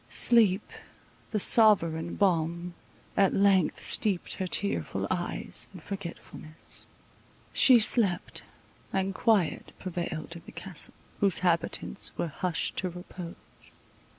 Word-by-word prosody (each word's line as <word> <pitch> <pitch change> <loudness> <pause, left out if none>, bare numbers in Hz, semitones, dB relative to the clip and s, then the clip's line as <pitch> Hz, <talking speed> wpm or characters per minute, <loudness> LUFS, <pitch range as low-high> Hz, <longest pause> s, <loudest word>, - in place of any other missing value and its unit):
Sleep, 215 -5 +4 0.6
the 215 - -1
sovereign 170 -7 +4
balm, 170 -2 0 0.4
at 195 -1 +3
length 195 -4 +2
steeped 195 -5 +1
her 190 - -3
tearful 200 +2 -1
eyes - - -2
in - - -8
forgetfulness. 170 -4 -8 0.7
She 255 -2 +7
slept; 210 -5 +2 0.5
and 195 0 -1
quiet 205 -5 +1
prevailed 170 -2 -5
in 170 - -9
the - - -9
Castle, 185 -5 -5 0.2
whose 195 -2 +3
inhabitants 170 - +1
were 170 - -2
hushed 175 +3 -2
to 185 - -1
repose. 180 0 -9
185 Hz, 110 wpm, -28 LUFS, 170-200 Hz, 0.7 s, She